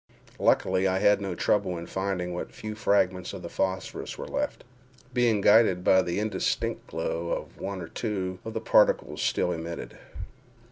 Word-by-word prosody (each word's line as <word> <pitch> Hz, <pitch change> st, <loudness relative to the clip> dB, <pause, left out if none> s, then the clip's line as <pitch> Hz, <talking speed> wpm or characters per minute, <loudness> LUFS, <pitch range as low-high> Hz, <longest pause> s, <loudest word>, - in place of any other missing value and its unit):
Luckily, 95 Hz, +1 st, +3 dB
I 95 Hz, 0 st, +1 dB
had 105 Hz, +1 st, +4 dB
no 95 Hz, -3 st, -3 dB
trouble 95 Hz, -1 st, +1 dB
in 85 Hz, -, -6 dB
finding 95 Hz, -2 st, -2 dB
what 90 Hz, -, -5 dB
few 110 Hz, 0 st, -6 dB
fragments 95 Hz, -4 st, +1 dB
of -, -, -7 dB
the -, -, -7 dB
phosphorus 95 Hz, -1 st, -3 dB
were -, -, -6 dB
left—being 125 Hz, -3 st, -2 dB
guided 105 Hz, -4 st, +5 dB
by 95 Hz, 0 st, +5 dB
the 85 Hz, -1 st, -2 dB
indistinct 105 Hz, -3 st, -1 dB
glow 85 Hz, +1 st, -3 dB
one 95 Hz, -1 st, -5 dB
or -, -, -7 dB
two 95 Hz, -4 st, -3 dB
of 110 Hz, 0 st, -7 dB
the 110 Hz, -, -1 dB
particles 105 Hz, -1 st, +3 dB
still 90 Hz, -, +1 dB
emitted. 85 Hz, 0 st, -6 dB
95 Hz, 155 wpm, -27 LUFS, 90-105 Hz, -, guided